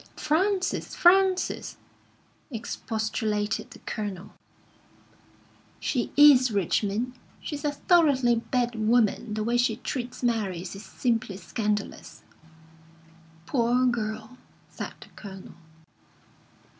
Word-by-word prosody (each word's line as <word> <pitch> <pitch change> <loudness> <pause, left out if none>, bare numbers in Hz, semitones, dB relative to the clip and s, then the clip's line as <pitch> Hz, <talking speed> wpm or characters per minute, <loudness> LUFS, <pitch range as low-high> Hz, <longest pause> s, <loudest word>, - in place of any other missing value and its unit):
"Frances, 370 +5 0
Frances!" 375 +1 +3 0.7
expostulated 220 -3 -2
the - - -12
Colonel. 200 -3 -5 1.5
"She 245 -4 -1
is, 280 -4 +8
Richmond. 205 +4 0 0.3
She's 295 -2 -6
a 295 - +1
thoroughly 285 -7 +3
bad 240 +1 -1
woman. 220 -1 +1
The 215 - -1
way 235 +2 +1
she 245 +2 +2
treats 250 -2 -5
Mary 210 -7 0
is 185 - -7
simply 220 0 -2
scandalous." 210 -1 -3 1.2
"Poor 245 +2 +2
girl!" 225 0 -2 0.3
said - - -6
the - - -13
Colonel. 190 -2 -11
235 Hz, 95 wpm, -27 LUFS, 215-260 Hz, 1.5 s, is